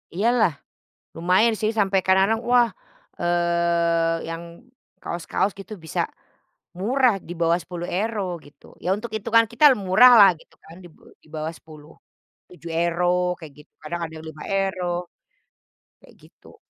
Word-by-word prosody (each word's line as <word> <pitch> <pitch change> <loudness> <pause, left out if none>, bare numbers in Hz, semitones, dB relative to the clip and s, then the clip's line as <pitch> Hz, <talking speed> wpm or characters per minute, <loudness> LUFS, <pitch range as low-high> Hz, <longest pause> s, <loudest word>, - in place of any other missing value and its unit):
Iya 210 +5 +1
lah. 180 -8 +3 0.6
Lumayan 185 +7 +3
sih, 215 0 +1
sampe 195 -1 +2
kadang-kadang, 195 +5 +3
wah, 240 -1 +5 0.5
eee 170 -1 +1
yang 165 0 -5 0.6
kaos-kaos 175 +3 -2
gitu 205 - -11
bisa 160 - -3 0.8
murah, 250 +3 +2
di - - -8
bawah 165 0 +3
10 175 -1 -7
euro, 215 +3 -2 0.2
gitu. 145 - -20 0.2
Ya 180 - -2
untuk 215 +1 -8
itungan 225 +2 +2
kita 265 +6 +3 0.2
murah 245 +7 +7
lah, 200 -1 +9
gitu - - -23
kan 165 - -14
di - - -11
be - - -25 0.2
di - - -23
bawah 155 +2 -4
10, 155 -1 -15 0.6
7 170 -1 -10
euro 180 +1 0
kayak 155 -3 -11
gitu, 150 - -18
kadang 170 +2 -5
ada 160 0 -11
5 155 -1 -10
euro, 190 -2 -1 1.1
kayak - - -20
gitu. - - -19
180 Hz, 145 wpm, -23 LUFS, 165-210 Hz, 1.1 s, lah